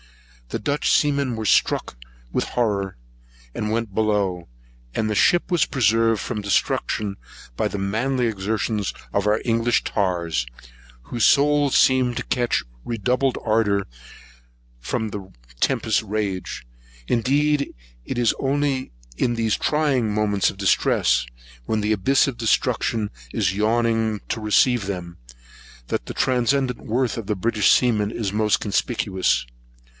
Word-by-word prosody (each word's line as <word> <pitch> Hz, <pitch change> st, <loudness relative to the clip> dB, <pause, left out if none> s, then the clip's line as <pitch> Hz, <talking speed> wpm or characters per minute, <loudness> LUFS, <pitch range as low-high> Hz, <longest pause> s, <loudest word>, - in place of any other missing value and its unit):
The -, -, -2 dB
Dutch 145 Hz, +1 st, 0 dB
seamen 140 Hz, -4 st, +2 dB
were 110 Hz, -1 st, -4 dB
struck 95 Hz, -, +2 dB, 0.4 s
with -, -, +1 dB
horror, 100 Hz, -, -1 dB, 0.6 s
and 105 Hz, -, -3 dB
went 115 Hz, -3 st, -2 dB
below; 100 Hz, -, 0 dB, 0.5 s
and 110 Hz, -1 st, 0 dB
the 105 Hz, -, -1 dB
ship 175 Hz, +11 st, +3 dB
was 170 Hz, -4 st, +3 dB
preserved 115 Hz, -3 st, +2 dB
from 105 Hz, -, -4 dB
destruction 100 Hz, 0 st, 0 dB, 0.4 s
by -, -, 0 dB
the -, -, -4 dB
manly 120 Hz, +6 st, 0 dB
exertion 110 Hz, 0 st, -1 dB, 0.3 s
of 100 Hz, 0 st, +1 dB
our 105 Hz, +1 st, +3 dB
English 115 Hz, 0 st, +2 dB
tars, 85 Hz, -, -1 dB, 0.6 s
whose 120 Hz, -, 0 dB
souls 145 Hz, -1 st, +4 dB
seemed 130 Hz, -2 st, +3 dB
to -, -, -2 dB
catch 120 Hz, -, 0 dB, 0.2 s
redoubled 125 Hz, +4 st, 0 dB
ardour 105 Hz, -3 st, +2 dB, 0.9 s
from 110 Hz, -, -2 dB
the 100 Hz, -2 st, -8 dB, 0.3 s
tempest's 110 Hz, 0 st, +1 dB
rage. 100 Hz, -, -3 dB, 0.4 s
Indeed 140 Hz, +4 st, +1 dB, 0.3 s
it -, -, -5 dB
is 120 Hz, -2 st, +3 dB
only 135 Hz, -1 st, 0 dB, 0.3 s
in 120 Hz, -1 st, +1 dB
these 115 Hz, -2 st, +1 dB
trying 140 Hz, -7 st, +1 dB
moments 105 Hz, -2 st, +1 dB
of -, -, -9 dB
distress, 100 Hz, -1 st, +2 dB, 0.4 s
when 110 Hz, -, 0 dB
the 105 Hz, +1 st, +1 dB
abyss 135 Hz, +9 st, +3 dB
of 135 Hz, -, -3 dB
destruction 110 Hz, -1 st, 0 dB, 0.2 s
is 95 Hz, -, 0 dB
yawning 110 Hz, 0 st, +1 dB
to 110 Hz, -, -2 dB
receive 110 Hz, 0 st, +3 dB
them, 90 Hz, -3 st, -5 dB, 0.7 s
that -, -, -3 dB
the -, -, -5 dB
transcendent 130 Hz, 0 st, +1 dB
worth 120 Hz, +1 st, -1 dB
of 110 Hz, -3 st, -6 dB
a 105 Hz, -, +1 dB
British 105 Hz, +1 st, +2 dB
seaman 110 Hz, -5 st, +3 dB
is 105 Hz, -4 st, -3 dB
most 105 Hz, 0 st, +2 dB
conspicuous. 100 Hz, -, 0 dB
110 Hz, 135 wpm, -22 LUFS, 105-125 Hz, 0.9 s, souls